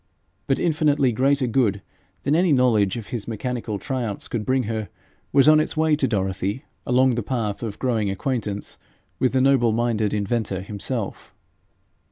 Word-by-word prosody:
But 135 - +2
infinitely 150 -5 +2
greater 135 +3 +2
good 110 -5 +1 0.4
than 140 - +1
any 175 0 +3
knowledge 120 -7 +3
of 115 - -8
his 115 -4 -4
mechanical 115 -1 -3
triumphs 120 -3 -4
could 110 -3 -4
bring 130 0 +2
her, 110 -3 -3 0.4
was 140 0 +5
on 155 0 +7
its 155 - -1
way 160 -1 +3
to 135 - +2
Dorothy 95 +2 -2 0.2
along 130 +1 +4
the 120 - -1
path 110 -3 -3
of 110 -4 -5
growing 115 -6 0
acquaintance 105 0 -3 0.4
with 130 - +1
the 130 - +3
noble 130 -4 +4
minded 110 -2 0
inventor 105 -2 -1
himself. 105 +3 -4
120 Hz, 160 wpm, -23 LUFS, 105-135 Hz, 0.4 s, on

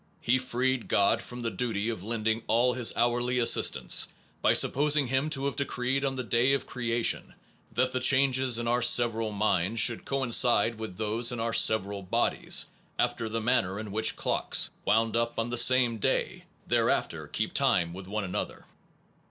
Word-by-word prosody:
He 125 +2 +1
freed 130 0 -2
God 100 - +2
from 125 0 -7
the 115 -1 -3
duty 110 0 -3
of 110 -6 -5
lending 110 +1 -2
all 120 +2 +2
this 125 -2 +2
hourly 120 +1 0
assistance, 120 -1 +2 0.3
by - - +3
sup - - +3
posing 145 +1 +2
Him 135 +4 0
to 140 -3 -3
have 140 - -2
decreed 135 0 -2
on 135 -1 -2
the 130 - -4
day 120 +3 +2
of 140 - -2
crea 120 -1 -3
tion - - 0 0.4
that 130 0 0
the 130 - -2
changes 130 -1 +2
in 120 0 -4
our 120 +1 0
several 115 -2 +3
minds 105 0 0
should 115 0 +2
coincide 120 -4 +2
with 110 -5 -7
those 110 +3 0
in 120 - -5
our 115 0 -2
several 100 -3 +2
bodies, 90 - 0 0.3
after 120 -2 -1
the 115 +1 -3
manner 100 -4 0
in 110 -2 -7
which 110 +2 0
clocks, - - 0
wound 110 +2 +1
up 115 0 -1
on 115 +1 -3
the 120 - -2
same 125 -3 +4
day, - - -2 0.2
thereafter - - -1
keep - - -3
time 85 0 +1
with 95 +1 -10
one 105 +2 -4
another. 95 - -5
120 Hz, 180 wpm, -27 LUFS, 110-125 Hz, 0.4 s, same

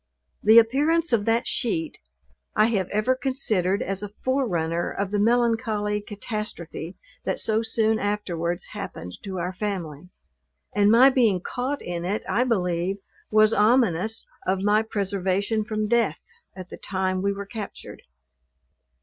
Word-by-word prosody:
The 220 +2 +6
appearance 290 +7 +4
of 210 -3 +2
that 230 +1 +2
sheet, 320 +5 -1 0.6
I 215 - +5
have 190 -4 0
ever 215 +5 +1
considered 220 -8 0
as 195 0 -2
a 205 - -5 0.2
forerunner 175 -11 0
of 200 -1 -3
the 205 - 0
melancholy 225 -2 +1
catastrophe 205 -5 -6 0.3
that - - -1
so 220 0 +1
soon 220 -1 +1
afterwards 175 -5 -2
happened 90 +1 -7
to 190 -2 -6
our 180 +1 -3
family: 180 -5 -5 0.6
and 205 0 +4
my 250 +5 +7
being 230 -8 +3
caught 260 +9 -3
in 175 -1 -4
it 195 +4 -2
I 245 +3 +1
believe, 180 -4 0 0.3
was 215 +1 +5
ominous 220 -2 +2 0.2
of 190 +1 0
my 210 +1 +4
preservation 200 0 -1
from 215 0 -2
death 230 -8 +2 0.4
at 185 -1 -9
the - - -7
time 185 -1 -2
we 200 +1 +1
were 200 0 -5
captured. 210 0 -8
210 Hz, 140 wpm, -25 LUFS, 185-225 Hz, 0.6 s, my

